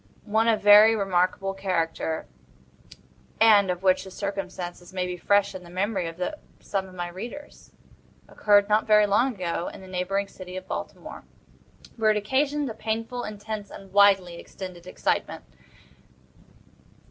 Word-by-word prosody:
One 220 +2 +1
of 225 -3 +2
very 210 +2 +8
remarkable 195 -1 0
character, 165 -4 -2 1.1
and 210 -3 +6
of 180 +1 -3
which 185 -1 +3
the 190 - -10
circumstances 185 -3 -6
may 185 -1 -2
be 180 0 -4
fresh 200 +3 +2
in 185 -1 -8
the 170 - -13
memory 190 0 -1
of 165 +1 -8 0.4
some 195 -2 -3
of 185 - -14
my 175 -1 -3
readers, 235 +11 -9 0.6
occurred, 205 -1 +3
not 215 +1 +2
very 210 -1 +6
long 235 +5 +2
ago, 175 -2 -3
in - - -8
the 190 - -12
neighboring 190 +2 -2
city 185 -1 -9
of 185 - -8
Baltimore, - - -7 0.7
where 220 -1 +3
it 215 - +3
occasioned 280 +7 0
a 230 - -4
painful, 225 +3 -3
intense, 210 0 -6
and 195 -1 -12
widely 195 -4 +4
extended 180 -2 -10
excitement. - - -2
195 Hz, 145 wpm, -25 LUFS, 185-215 Hz, 1.1 s, very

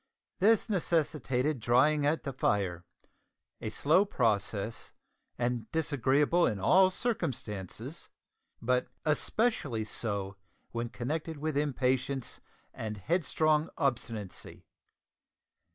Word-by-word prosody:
This 220 +4 +4
necessitated 150 - 0
drying 145 +6 +3
at 155 +2 +1
the 140 - -4
fire 95 -8 0 0.8
a - - -3
slow 160 +7 +3
process 110 - -1 0.4
and 120 -2 -2
disagreeable 150 +2 +2
in 105 - -1
all 185 - +5
circumstances, 115 - -4 0.5
but 125 +2 +1 0.2
especially 150 - +1
so 100 -2 -3 0.3
when 120 0 -3
connected 155 +7 -3
with 155 0 -2
impatience 135 -2 0 0.3
and 110 -1 -5
headstrong 155 - +1
obstinacy. 115 - -3
135 Hz, 90 wpm, -31 LUFS, 115-155 Hz, 0.8 s, all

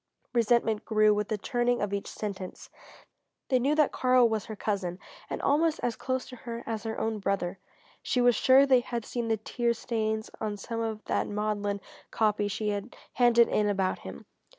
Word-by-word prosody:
Resentment 230 -2 +2
grew 215 -1 +4
with 210 0 -1
the 215 - -1
turning 240 +3 0
of 205 -1 -2
each 200 - -2
sentence. 195 -3 -6 0.8
They 255 -2 +3
knew 280 +5 +2
that 305 -2 +3
Karl 255 -1 +4
was 220 -2 -2
her 220 - -7
cousin, 195 -4 -2 0.3
and - - -3
almost 315 +3 +2
as 240 -2 0
close 260 0 -2
to 255 - -9
her 235 0 -7
as 225 -2 -3
her 220 0 -3
own 220 -1 -1
brother. 195 -2 -1 0.4
She 250 - 0
was 245 0 +5
sure 265 +1 +6
they 260 -2 +5
had 235 -2 -4
seen 235 -2 -3
the 225 -1 +1
tear 235 +2 -1
stains 220 -2 -2
on 210 -1 -2
some 230 +3 -5
of 220 -1 -4
that - - 0
maudlin 205 -1 -2 0.3
copy 210 -2 +1
she 210 +1 -2
had 205 +3 -4 0.2
handed 235 -1 +5
in 210 -1 +1
about 190 -2 0
him. - - -9
220 Hz, 190 wpm, -28 LUFS, 210-245 Hz, 0.8 s, sure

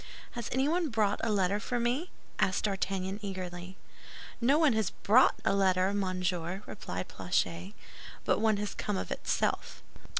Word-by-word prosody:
"Has 235 -2 -5
anyone 305 +6 +1
brought 215 -4 +1
a 225 - +1
letter 200 0 +2
for 245 +3 -2
me?" 250 +9 0 0.3
asked 185 - +2
D'Artagnan, 195 -1 -1
eagerly. 185 -2 -6 0.6
"No 270 +5 +4
one 310 -5 +4
has 220 -3 +1
brought 240 +6 +4
a - - +3
letter, 190 0 +3
monsieur," 185 -1 -1
replied 90 - -5
Planchet; 90 0 -1 0.5
"but - - +2
one 220 -2 +3
has 205 0 -3
come 205 -2 -2
of - - -4
itself." - - -1
200 Hz, 145 wpm, -31 LUFS, 185-225 Hz, 0.6 s, No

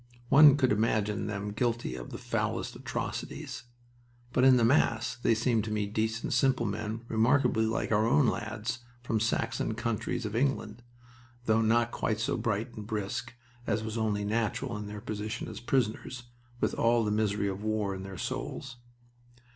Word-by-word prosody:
One 145 0 +8
could 130 -3 +3
imagine 105 -1 +1
them 105 0 -3
guilty 120 - -1
of 60 -1 -7
the - - -6
foulest - - -2
atrocities. - - -5 0.7
But 125 - +3
in 130 -1 +7
the 115 - +4
mass 115 -3 +2
they 120 -1 +2
seemed 115 -1 +1
to 110 - -4
me 105 -1 0
decent, 110 +2 -1
simple 125 -1 +3
men, 105 +2 -3
remarkably 115 0 +3
like 110 0 -1
our 110 +1 +3
own 135 +3 +4
lads 115 0 -2 0.2
from 115 -3 0
the - - +1
Saxon 115 0 -1
counties 115 -2 -2
of 105 0 -4
England, 120 -3 0 0.6
though 110 -1 +3
not 115 +1 +3
quite 110 -1 -1
so 110 - 0
bright 110 +2 -2
and 105 -1 -8
brisk, 110 +3 -3 0.3
as 110 - 0
was 110 0 -4
only 105 -2 0
natural 115 +3 -1
in 105 0 -5
their 105 0 -7
position 110 -1 -4
as - - -7
prisoners, 125 0 -1 0.4
with - - +1
all 115 -1 +3
the 105 - 0
misery 105 -1 +1
of 95 0 -3
war 110 -2 0
in 95 - -6
their 95 -1 -7
souls. 135 +8 -4
110 Hz, 170 wpm, -30 LUFS, 105-120 Hz, 0.7 s, One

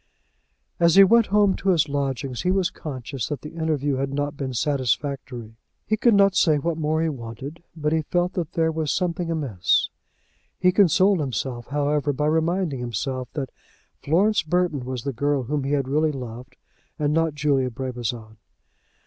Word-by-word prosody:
As 170 -1 +4
he 195 - +10
went 230 +3 +5
home 205 -1 +3
to 195 - -1
his 165 -4 +3
lodgings 135 -2 -2
he 180 - 0
was 185 -1 +1
conscious 135 -3 -5
that 150 - -4
the 150 - -8
interview 150 -4 -1
had 135 0 -2
not 145 +1 -2
been 135 -2 -4
satisfactory. 130 -2 -2 0.3
He 215 - +1
could 225 0 +4
not 200 -1 +5
say 160 -5 +4
what 165 +3 -2
more 155 +1 +1
he 165 - +1
wanted, 135 +4 -7
but 150 -1 -1
he 160 - +2
felt 175 +4 -1
that 170 -4 -3
there 160 -1 +2
was 155 -2 -1
something 175 -2 -1
amiss. 135 - +1 0.7
He 180 - +4
consoled 190 0 +4
himself, 125 -3 -3
however, 145 0 0
by 150 +2 -1
reminding 160 -1 0
himself 125 +2 -3
that 135 -4 -4 0.5
Florence 195 +8 +2
Burton 165 -5 0
was 125 -2 -4
the 140 - -3
girl 140 +2 0
whom 145 +3 -2
he 140 - -1
had 140 -3 0
really 155 +3 +2
loved, 125 -1 -8 0.4
and 150 0 0
not 165 -1 +1
Julia 140 -3 +1
Brabazon. 120 -3 -5
145 Hz, 175 wpm, -24 LUFS, 130-165 Hz, 0.7 s, he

